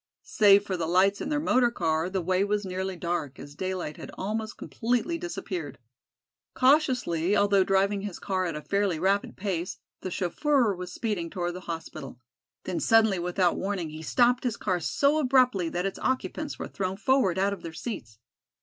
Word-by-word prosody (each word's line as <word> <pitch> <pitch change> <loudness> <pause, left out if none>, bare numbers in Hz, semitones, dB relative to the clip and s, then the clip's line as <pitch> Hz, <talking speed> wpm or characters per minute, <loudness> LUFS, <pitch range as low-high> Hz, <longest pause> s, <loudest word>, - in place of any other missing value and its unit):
Save 205 - +5
for 190 - -2
the 165 -2 -2
lights 190 +4 +3
in - - -3
their 300 -1 +1
motor 255 -5 +3
car 160 -6 0
the 190 -1 -2
way 185 +2 +2
was 205 0 -1
nearly 190 0 -3
dark, 170 -5 -3
as 145 - -10
daylight 185 -2 -4
had - - -9
almost 220 +3 -3
completely 245 +9 -1
disappeared. 185 - -5 0.8
Cautiously, 250 - +3
although 200 -1 +4
driving 195 +1 +1
his 200 -3 -5
car 185 -1 -1
at 165 - -4
a 150 - -6
fairly 200 -4 0
rapid 195 +4 0
pace, 185 -3 -3 0.2
the 185 - -4
chauffeur 235 - +1
was 180 -1 -7
speeding 205 -8 -3
toward 175 -2 -3
the 180 - -6
hospital. 150 -6 -6 0.4
Then 180 - -3
suddenly 220 -4 +4
without 180 0 +1
warning 190 -5 -2
he 155 +1 -8
stopped 245 +8 +2
his 245 -4 -1
car 185 -3 -1
so 285 - +2
abruptly 255 - +3
that 175 +2 -2
its 195 - -3
occupants 285 +3 -2
were - - -5
thrown 190 -1 -3
forward 225 -5 +2
out 200 +1 +2
of 200 - -8
their 165 - -6
seats. 140 - -6
195 Hz, 180 wpm, -27 LUFS, 175-225 Hz, 0.8 s, Save